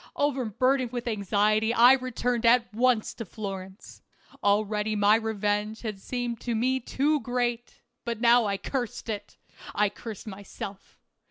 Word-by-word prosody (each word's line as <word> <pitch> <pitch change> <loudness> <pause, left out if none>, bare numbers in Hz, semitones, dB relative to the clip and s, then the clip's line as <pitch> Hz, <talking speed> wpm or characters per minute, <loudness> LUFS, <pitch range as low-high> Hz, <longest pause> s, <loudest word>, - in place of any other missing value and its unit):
Overburdened 255 -2 +1
with 245 -1 -4
anxiety 215 +1 +1
I 245 +3 +8
returned 250 -2 -1
at 235 -1 +4
once 240 -1 +2
to 230 - -6
Florence. 195 -1 -8 0.4
Already 210 +1 +1
my 205 0 +4
revenge 215 -1 -1
had 215 -4 -4
seemed 245 -1 -4
to 235 -2 -2
me 255 +4 +1
too 290 +4 0
great, 240 -1 -3 0.2
but 235 -2 -3
now 235 -1 +5
I 200 -1 -1
cursed 240 +2 -4
it; 205 -1 -5 0.4
I 210 0 +3
cursed 215 0 -9
myself. 200 -1 -9
225 Hz, 140 wpm, -27 LUFS, 210-245 Hz, 0.4 s, I